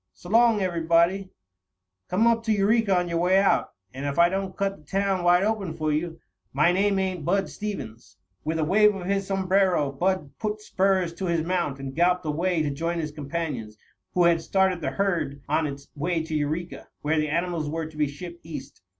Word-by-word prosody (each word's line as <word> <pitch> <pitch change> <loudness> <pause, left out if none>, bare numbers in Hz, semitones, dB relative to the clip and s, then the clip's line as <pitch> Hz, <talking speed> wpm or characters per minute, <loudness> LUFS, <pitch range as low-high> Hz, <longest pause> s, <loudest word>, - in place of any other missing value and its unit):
S'long 225 +3 +3
everybody. 170 +2 +2 0.8
Come 200 +5 +2
up 230 -1 +3
to 220 - +1
Eureka 205 -1 +3
on 180 0 0
your 170 -1 -1
way 180 +2 +3
out, 195 0 +2 0.2
and 135 +2 -6
if 140 - -3
I 170 0 +6
don't 190 0 -3
cut 195 0 -1
the - - -20
town 195 +3 0
wide 175 +1 +5
open 200 -6 -1
for 155 -1 -1
you, 165 +2 -2 0.3
my 150 +6 +4
name 195 +2 +2
ain't 185 -4 -1
Bud 195 +4 +1
Stevens." 120 - -7 0.3
With 160 +2 -1
a 160 - +1
wave 210 +5 +4
of 185 -2 -6
his 195 0 -1
sombrero, 190 -6 +2
Bud 170 0 -1
put 215 -1 -2
spurs 190 -4 +1
to 190 - -5
his 165 -2 0
mount 170 -6 -1
and 135 -1 -6
galloped 180 +1 +2
away 165 +2 0
to 145 - -1
join 165 +4 -2
his 155 -2 -3
companions, 145 -7 -4 0.4
who 180 - +4
had 170 -1 +4
started 190 -1 +1
the - - -1
herd 170 -8 -1
on 155 +2 +1
its 140 0 -8
way 165 +2 -1
to 160 0 -6
Eureka, 155 +4 -3 0.2
where 155 +1 +1
the 150 0 0
animals 170 -1 -1
were 160 +1 -3
to 155 0 -11
be 150 -1 +1
shipped 170 +4 -9
East. 145 -4 -9
175 Hz, 200 wpm, -25 LUFS, 155-195 Hz, 0.8 s, I